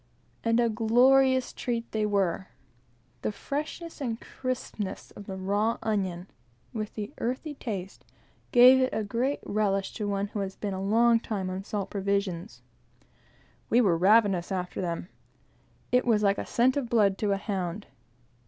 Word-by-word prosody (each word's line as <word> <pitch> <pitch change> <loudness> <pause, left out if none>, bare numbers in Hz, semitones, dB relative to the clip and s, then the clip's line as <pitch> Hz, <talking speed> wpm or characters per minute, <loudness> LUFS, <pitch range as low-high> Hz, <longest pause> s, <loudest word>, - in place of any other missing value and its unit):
And 230 0 +2
a 235 - +4
glorious 255 +4 +4
treat 235 -2 -3
they 215 -1 0
were. 195 -2 0 0.7
The - - -1
freshness 305 +7 -5
and 235 -4 -2
crispness 240 -6 -5
of 200 - -11
the 190 - -5
raw 205 +4 0
onion, 190 -5 -1 0.5
with 215 -2 -4
the 210 -1 -5
earthy 260 +6 -3
taste, 200 -9 -6 0.5
give 255 +1 +8
it 255 - +2
a 220 - -1
great 240 +7 -1
relish 200 -2 0
to 210 - -3
one 200 0 -1
who 210 - -4
has 195 -1 -3
been 205 -2 -4
a 190 - -4
long 230 +4 +4
time 195 -5 -3
on 190 +1 -4
salt 200 -1 -4
provisions. 190 - -2 1.1
We 235 - +4
were 210 -7 +4
perfectly 165 +2 -2
ravenous 205 -5 +4
after 180 -1 -3
them. 175 0 -3 0.8
It 250 0 +3
was 215 -3 +3
like 200 0 +3
a - - -5
scent 255 +3 +2
of 255 -5 -2
blood 210 -5 +3
to 205 -2 +1
a - - 0
hound. 195 -1 -3
210 Hz, 160 wpm, -28 LUFS, 195-235 Hz, 1.1 s, give